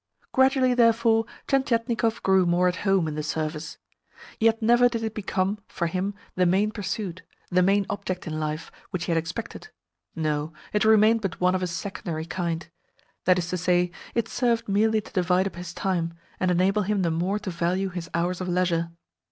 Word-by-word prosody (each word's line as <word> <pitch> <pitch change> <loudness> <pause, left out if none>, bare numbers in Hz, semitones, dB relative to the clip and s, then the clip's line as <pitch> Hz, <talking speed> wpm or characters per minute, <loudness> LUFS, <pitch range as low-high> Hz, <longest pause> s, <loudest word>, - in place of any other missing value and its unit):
Gradually, 265 -1 +4
therefore, 230 -1 +4 0.2
Tientietnikov 230 -4 +1
grew 190 -2 +4
more 175 +1 +3
at 180 0 0
home 195 -4 +2
in 155 - -3
the 150 - -3
Service. 155 +1 -3 0.6
Yet 225 0 +3
never 240 +2 +5
did 230 -1 -3
it 220 -1 -2
become, 195 -1 -1
for 170 - -3
him, 185 +4 -2 0.2
the 180 -1 +2
main 200 +4 +2
pursuit, 195 -3 -4 0.3
the 180 +1 +4
main 195 +2 +3
object 185 -2 -4
in 155 -2 -3
life, 155 +1 -3 0.2
which 180 -3 -3
he - - -2
had 165 - +2
expected. 165 - -6 0.5
No, 155 -1 -1 0.2
it 210 - +2
remained 220 +1 +5
but 195 -3 -3
one 180 0 +3
of 185 - 0
a 180 - 0
secondary 170 -2 -4
kind. 170 -2 -3 0.6
That 185 0 +5
is 175 -1 -1
to 180 - -1
say, 180 0 +2 0.2
it 235 -2 +1
served 235 -2 0
merely 215 +2 +2
to - - -15
divide 180 0 +2
up 195 - -4
his 175 0 -7
time, 170 -2 -2 0.2
and 185 - +1
enable 185 +4 +2
him 205 -1 0
the 170 - +1
more 180 +5 0
to 210 -2 -5
value 175 +3 0
his 175 -2 -6
hours 175 +2 0
of 185 - -3
leisure. 175 -2 +1
185 Hz, 190 wpm, -25 LUFS, 175-215 Hz, 0.6 s, never